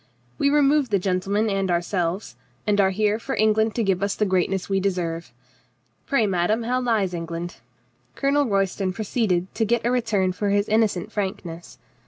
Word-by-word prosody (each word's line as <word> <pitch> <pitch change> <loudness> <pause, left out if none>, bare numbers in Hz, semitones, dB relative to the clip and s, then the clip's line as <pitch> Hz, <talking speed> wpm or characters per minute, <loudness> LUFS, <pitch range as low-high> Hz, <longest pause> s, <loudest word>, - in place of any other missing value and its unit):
We 280 - +3
removed 290 -1 +3
the 205 - +3
gentleman 195 +3 0
and 195 -2 0
ourselves, 175 - -1 0.3
and 205 -1 +3
are 190 - +4
here 210 +2 +1
for 265 +3 -4
Eng 215 0 +3
land 220 0 +1
to 235 - +1
give 190 -2 +1
us 200 0 0
the 210 - +1
greatness 185 0 0
we 195 -1 +1
deserve. 170 -6 -2 0.8
Pray, 275 -6 +2
madame, 195 +4 +1
how 250 +2 0
lies 220 -7 +1
England?" 170 0 -5 0.6
(Colonel 280 0 +2
Royston 195 -2 0
proceeded 195 -4 -1
to 225 - 0
get 230 +1 +1
a 240 - +2
return 215 -7 +1
for 200 +3 -2
his 205 +1 +2
innocent 215 -3 +1
frank 200 -2 -3
ness.) 170 0 -9
200 Hz, 180 wpm, -23 LUFS, 185-225 Hz, 0.8 s, are